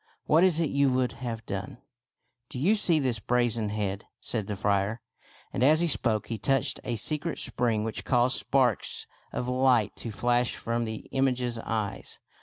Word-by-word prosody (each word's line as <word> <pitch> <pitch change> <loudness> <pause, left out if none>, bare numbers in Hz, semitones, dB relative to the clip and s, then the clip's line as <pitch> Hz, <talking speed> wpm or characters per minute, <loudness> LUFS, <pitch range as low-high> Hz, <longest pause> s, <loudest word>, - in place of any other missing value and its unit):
What 160 +3 +4
is 180 -4 +4
it 165 -3 0
you 140 -1 +3
would 125 -1 +1
have 115 -3 -4
done? 100 +3 -5 0.3
" - - -56
" 120 -1 -54
Do - - -7
you 170 +12 +3
see 185 -6 +4
this 130 -6 0
brazen 120 -2 +1
head? 100 -1 -3
" - - -64
said 110 -4 -1
the 105 - -3
friar; 100 +2 0 0.5
and - - -2
as 155 +4 +5
he 175 - +3
spoke 115 -8 +1
he 115 -2 -5
touched 135 -1 +1
a 120 - -2
secret 150 - -1
spring 115 -3 0
which 110 0 -4
caused 125 +1 +2
sparks 125 -6 +1 0.3
of 125 - -3
light 125 -4 +2
to 115 - -6
flash 120 +2 0
from 115 0 -2
the 110 -1 -6
image's 125 -3 0
eyes. 105 - -4
120 Hz, 190 wpm, -28 LUFS, 110-135 Hz, 0.5 s, as